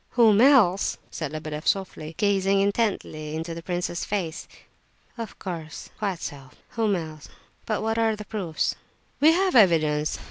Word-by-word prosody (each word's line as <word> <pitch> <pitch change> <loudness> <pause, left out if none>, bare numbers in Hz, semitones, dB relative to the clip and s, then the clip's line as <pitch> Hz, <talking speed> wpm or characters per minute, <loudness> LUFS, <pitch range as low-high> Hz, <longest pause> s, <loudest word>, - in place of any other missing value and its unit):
"Whom 220 -3 +6
else?" 230 -9 +5
said 155 -3 -4
Lebedeff, 155 0 -6
softly, 165 -5 -1
gazing 195 -1 +2
intently 195 -7 -1
into 165 +1 -4
the 165 - -7
prince 175 +1 -2
s 170 - -4
face. 180 -5 -3 0.7
"Of 230 -3 -7
course—quite 175 +2 -5
so, 135 -3 -7 0.2
whom 220 -3 0
else? 155 -3 -7 0.4
But 215 -1 -1
what 225 +1 0
are 225 -1 +2
the 210 0 -9
proofs?" 185 -8 -2 0.5
"We 305 +3 +7
have 375 -1 +1
evidence. 155 -8 +4
190 Hz, 145 wpm, -25 LUFS, 160-215 Hz, 0.7 s, We